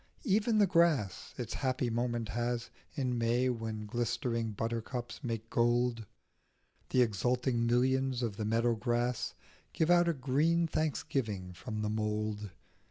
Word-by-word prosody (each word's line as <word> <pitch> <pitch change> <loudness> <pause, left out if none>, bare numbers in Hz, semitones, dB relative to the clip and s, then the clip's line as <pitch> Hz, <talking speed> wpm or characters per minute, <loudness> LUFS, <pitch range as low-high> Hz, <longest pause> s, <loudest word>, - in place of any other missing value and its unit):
Even 220 -1 +2
the 210 - +6
grass 165 - +2
its 120 -3 -4
happy 130 -3 -1
moment 120 -1 -1
has 120 +1 -2 0.2
In 125 -5 -1
May, 120 +2 +2
when 110 -3 -3
glistering 115 +1 -1
buttercups 115 +4 -4
make 115 -2 -4
gold; 120 -1 +2 0.8
The 125 - +5
exulting 120 +2 +1
millions 130 +1 +2
of 110 -4 -2
the 105 0 -3
meadow 115 +2 +2
grass 120 +2 -1 0.4
Give 160 +2 +2
out 175 -1 +5
a - - +2
green 150 +5 +2
thanksgiving 115 - -2
from 110 +4 -5
the 105 - 0
mould. 105 -1 -2
120 Hz, 135 wpm, -32 LUFS, 110-130 Hz, 0.8 s, the